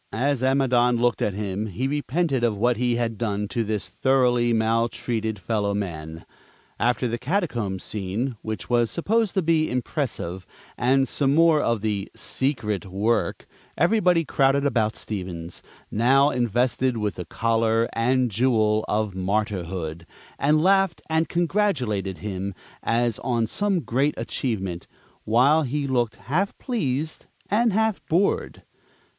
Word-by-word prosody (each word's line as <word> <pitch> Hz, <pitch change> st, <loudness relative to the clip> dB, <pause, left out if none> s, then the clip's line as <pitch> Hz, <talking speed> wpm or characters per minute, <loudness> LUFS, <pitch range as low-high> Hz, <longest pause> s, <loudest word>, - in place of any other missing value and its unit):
As 130 Hz, +4 st, 0 dB
Amidon 125 Hz, -2 st, +3 dB
looked 120 Hz, -4 st, +1 dB
at 100 Hz, -, 0 dB
him, 105 Hz, +1 st, -3 dB
he 115 Hz, +7 st, -2 dB
repented 145 Hz, -1 st, 0 dB
of 115 Hz, -3 st, +1 dB
what 120 Hz, +2 st, +2 dB
he 120 Hz, 0 st, +1 dB
had 115 Hz, -2 st, -2 dB
done 105 Hz, -3 st, -1 dB
to 120 Hz, -3 st, -1 dB
this 105 Hz, -2 st, -2 dB
thoroughly 120 Hz, +3 st, +2 dB
maltreated 115 Hz, 0 st, 0 dB
fellow 100 Hz, -1 st, -1 dB
man. 80 Hz, -5 st, -5 dB, 0.5 s
After 125 Hz, +1 st, +1 dB
the 120 Hz, 0 st, -3 dB
Catacombs 125 Hz, -, -2 dB
scene, 110 Hz, +5 st, -3 dB
which 105 Hz, -6 st, -5 dB
was 120 Hz, +1 st, +2 dB
supposed 215 Hz, -, 0 dB
to 190 Hz, -, +2 dB
be 160 Hz, -1 st, +2 dB
impressive, 120 Hz, -, -3 dB, 0.3 s
and 135 Hz, +2 st, +2 dB
some 140 Hz, +1 st, +1 dB
more 165 Hz, -2 st, +5 dB
of 115 Hz, -3 st, 0 dB
the 105 Hz, -2 st, -2 dB
"secret" 115 Hz, -7 st, -2 dB
work, 105 Hz, +5 st, 0 dB, 0.3 s
everybody 175 Hz, -2 st, +3 dB
crowded 140 Hz, 0 st, +2 dB
about 110 Hz, -5 st, +1 dB
Stevens, 90 Hz, -4 st, -6 dB, 0.3 s
now 135 Hz, +6 st, +4 dB
invested 125 Hz, +1 st, +1 dB
with 105 Hz, -2 st, -1 dB
the 90 Hz, -, -7 dB
collar 115 Hz, +2 st, +1 dB
and 125 Hz, +1 st, +1 dB
"jewel" 110 Hz, -1 st, +2 dB
of 105 Hz, -1 st, 0 dB
Martyrhood, 95 Hz, -4 st, -2 dB, 0.3 s
and 155 Hz, +2 st, +3 dB
laughed, 195 Hz, -1 st, +3 dB
and 160 Hz, +1 st, +1 dB
congratulated 145 Hz, -, 0 dB
him 100 Hz, -1 st, -4 dB, 0.3 s
as 115 Hz, -1 st, 0 dB
on 120 Hz, -3 st, 0 dB
some 195 Hz, -, 0 dB
great 140 Hz, +4 st, 0 dB
achievement, 110 Hz, -6 st, -3 dB, 0.4 s
while 130 Hz, +8 st, +4 dB
he 145 Hz, +1 st, -2 dB
looked 120 Hz, -4 st, 0 dB
half 185 Hz, +9 st, -2 dB
pleased 155 Hz, -, -3 dB, 0.2 s
and 230 Hz, +2 st, +3 dB
half 220 Hz, 0 st, 0 dB
bored. 185 Hz, +5 st, 0 dB
120 Hz, 135 wpm, -24 LUFS, 105-140 Hz, 0.5 s, more